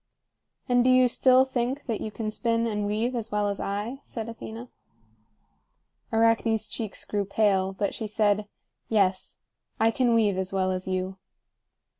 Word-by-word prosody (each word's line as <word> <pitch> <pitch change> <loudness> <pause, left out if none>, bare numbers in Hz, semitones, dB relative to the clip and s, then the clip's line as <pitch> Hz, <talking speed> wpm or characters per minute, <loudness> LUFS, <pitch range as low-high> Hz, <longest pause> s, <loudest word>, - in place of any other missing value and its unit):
"And 245 -1 +4
do 255 - +3
you 255 0 +6
still 255 +1 +5
think 260 +2 -2
that 225 -5 -3
you - - -3
can 215 0 -4
spin 230 +2 0
and 210 -2 -1
weave 220 +4 0
as 230 -2 -4
well 210 0 +1
as 200 - -4
I?" 210 +7 -3
said 225 -2 -6
Athena. 230 +1 -8 1.4
Arachne's 225 -1 +2
cheeks 215 -1 -5
grew 205 -1 -1
pale, 195 -1 +1
but 200 +1 -2
she 220 - -4
said: 210 -1 +1 0.4
"Yes. 190 -4 +1 0.4
I 225 +1 +4
can 240 0 +2
weave 205 -4 +2
as 190 0 -2
well 190 -1 +1
as 185 0 -4
you." 185 0 -2
220 Hz, 160 wpm, -26 LUFS, 200-235 Hz, 1.4 s, you